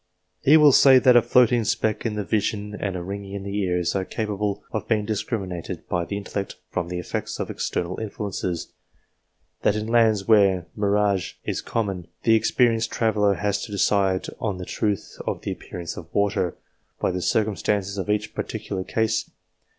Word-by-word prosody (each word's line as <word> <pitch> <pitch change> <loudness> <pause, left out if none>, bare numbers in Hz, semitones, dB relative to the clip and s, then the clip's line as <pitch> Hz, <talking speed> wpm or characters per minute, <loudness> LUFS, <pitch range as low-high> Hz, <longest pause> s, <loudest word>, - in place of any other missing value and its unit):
He 150 +4 +7
will 150 -2 +7
say 135 0 +7
that 125 -1 +6
a 120 - +8
floating 120 0 +4
speck 110 +2 0
in 110 - -3
the 105 - -2
vision, 105 0 -1
and 100 -2 -3
a 90 - -4
ringing 100 +1 -6
in 100 -1 -5
the 100 0 -5
ears, 90 -2 0
are 95 - 0
capable 105 -1 -3
of - - -3
being 105 -2 +1
discriminated 95 -5 -4
by 85 -1 -1
the 100 - -4
intellect 100 -1 -4 0.2
from 90 -2 -2
the 90 0 -4
effects 90 - -4
of - - -3
external 90 +1 -3
influences; 100 -5 -4 0.9
that 105 - +2
in 105 0 -2
lands 110 -3 +3
where 100 -5 +4
mirage 100 -2 +1
is - - -2
common, 95 -6 -3 0.2
the 115 -1 +5
expe 120 +3 +3
rienced 115 -1 0
traveller 105 -3 +2
has 105 0 -1
to - - -7
decide 100 -1 +2
on 105 -4 -2
the 90 - -6
truth 105 0 -2
of - - -2
the - - -2
appear - - -8
ance 85 -1 -5
of 85 -1 -10
water, 100 -4 +1 0.4
by - - +1
the 90 0 -3
circumstances 100 -1 0
of 95 - -4
each 105 0 0
particular 95 -1 -4
case. 110 +2 0
100 Hz, 180 wpm, -24 LUFS, 95-110 Hz, 0.9 s, a